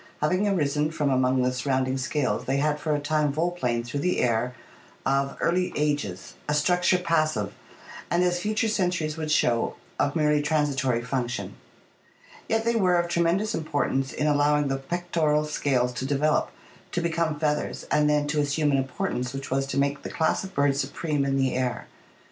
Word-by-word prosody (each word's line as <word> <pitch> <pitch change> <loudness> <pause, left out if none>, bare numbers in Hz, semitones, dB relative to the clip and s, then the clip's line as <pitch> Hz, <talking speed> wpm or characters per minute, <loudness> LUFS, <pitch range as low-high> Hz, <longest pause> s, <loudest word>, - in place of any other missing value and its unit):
Having 185 +7 +1
arisen 150 -5 +1
from 150 -3 0
among 130 0 +2
the 125 0 +1
surrounding 130 0 0
scales, 135 +1 -1
they 135 +1 0
had 150 +1 +1
for 150 0 0
a - - 0
time 150 0 +1
volplaned 140 -7 -1
through 130 +4 -3
the 180 +5 0
air 125 +1 +1 0.5
of 135 0 0
early 180 +2 +1
ages, 145 -12 -2 0.2
a 150 - +2
structure 180 +4 +3
passive, 155 - 0 0.6
and, 175 +1 +2
as 175 0 +1
future 215 +4 0
centuries 180 -7 0
would 155 -1 -4
show, 120 -6 +2 0.2
of 145 +1 +1
merely 150 -2 +3
transitory 140 -5 0
function. 125 -1 -3 1.0
Yet 225 0 +1
they 235 - +2
were 185 -5 +3
of 175 0 0
tre 170 0 +1
mendous 195 +6 +1
importance 145 -5 -1
in 150 - -2
allowing 145 -1 +3
the 135 - 0
pectoral 155 0 0
scales 130 -5 0
to 130 - -4
develop, 145 +2 +1 0.4
to - - +1
become 165 -2 -1
feathers, 150 -1 -1
and 150 0 +3
then 150 0 +2
to 150 0 +1
assume 145 +1 +1
an 140 - +3
importance 130 -2 -3
which 135 -1 -6
was 135 +1 0
to 135 - -3
make 140 +1 +1
the - - -6
class 160 +3 0
of 190 0 -9
birds 140 -1 +2
supreme 145 +1 -2
in 135 0 0
the 135 -1 +1
air. 125 -1 -2
150 Hz, 180 wpm, -26 LUFS, 135-165 Hz, 1.0 s, structure